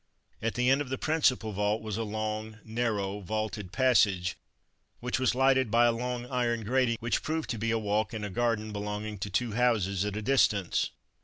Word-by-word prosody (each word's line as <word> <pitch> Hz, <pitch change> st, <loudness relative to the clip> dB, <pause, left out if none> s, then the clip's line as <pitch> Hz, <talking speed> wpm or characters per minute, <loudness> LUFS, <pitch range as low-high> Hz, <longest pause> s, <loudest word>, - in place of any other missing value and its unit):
At 115 Hz, 0 st, -1 dB
the 125 Hz, 0 st, +1 dB
end 135 Hz, +2 st, +3 dB
of 140 Hz, -, -5 dB
the 130 Hz, -, -2 dB
principal 135 Hz, -8 st, +1 dB
vault 105 Hz, +2 st, 0 dB
was 110 Hz, -2 st, -3 dB
a 115 Hz, -, -1 dB
long, 110 Hz, 0 st, -4 dB
narrow, 110 Hz, -3 st, -1 dB
vaulted 105 Hz, -1 st, -4 dB
passage, 100 Hz, -8 st, +3 dB, 0.6 s
which 125 Hz, +1 st, -2 dB
was 130 Hz, -1 st, +2 dB
lighted 130 Hz, -2 st, +3 dB
by 120 Hz, +2 st, +4 dB
a 120 Hz, -, +5 dB
long 125 Hz, +1 st, -3 dB
iron 120 Hz, -2 st, -1 dB
grating 125 Hz, +1 st, +1 dB
which 115 Hz, +1 st, 0 dB
proved 160 Hz, 0 st, -2 dB
to 115 Hz, -, -3 dB
be 115 Hz, +2 st, -1 dB
a 115 Hz, -, +2 dB
walk 105 Hz, -1 st, 0 dB
in 110 Hz, -2 st, -5 dB
a 105 Hz, -, -4 dB
garden 110 Hz, 0 st, 0 dB
belonging 105 Hz, 0 st, -4 dB
to 100 Hz, -, -3 dB
two 115 Hz, +4 st, 0 dB
houses 105 Hz, -5 st, +1 dB
at 105 Hz, 0 st, -3 dB
a 110 Hz, -, -4 dB
distance. 105 Hz, -7 st, +2 dB
110 Hz, 200 wpm, -29 LUFS, 105-125 Hz, 0.6 s, a